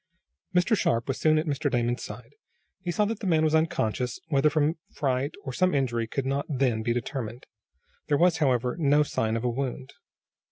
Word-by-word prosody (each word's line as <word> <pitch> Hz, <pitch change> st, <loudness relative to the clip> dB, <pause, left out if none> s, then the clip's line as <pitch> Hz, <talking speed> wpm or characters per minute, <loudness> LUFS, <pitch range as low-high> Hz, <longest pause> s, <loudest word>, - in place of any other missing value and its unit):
Mr. 180 Hz, +6 st, +4 dB
Sharp 115 Hz, -, 0 dB
was 135 Hz, -, -2 dB
soon 155 Hz, 0 st, +4 dB
at 155 Hz, -, +1 dB
Mr. 145 Hz, -1 st, -1 dB
Damon's 120 Hz, -1 st, 0 dB
side. -, -, -9 dB, 0.5 s
He 180 Hz, -, -5 dB
saw 190 Hz, +5 st, +2 dB
that 220 Hz, 0 st, -3 dB
the 200 Hz, -, -4 dB
man 160 Hz, -3 st, +3 dB
was 155 Hz, -1 st, +2 dB
unconscious, 125 Hz, -6 st, 0 dB
whether 145 Hz, 0 st, +3 dB
from 155 Hz, +2 st, +1 dB
fright 135 Hz, 0 st, -1 dB
or 130 Hz, -, -5 dB
some 185 Hz, +4 st, +2 dB
injury 120 Hz, -4 st, 0 dB
could 135 Hz, +3 st, -3 dB
not 140 Hz, +1 st, -1 dB
then 130 Hz, -6 st, +1 dB
be 115 Hz, -, 0 dB
determined. 120 Hz, 0 st, -4 dB, 0.6 s
There 145 Hz, -, +2 dB
was, 170 Hz, 0 st, +4 dB
however, 125 Hz, -4 st, +1 dB
no 145 Hz, -1 st, +4 dB
sign 115 Hz, -5 st, -1 dB
of 115 Hz, -, -4 dB
a -, -, +1 dB
wound. 130 Hz, +1 st, -4 dB
140 Hz, 195 wpm, -27 LUFS, 125-155 Hz, 0.6 s, Mr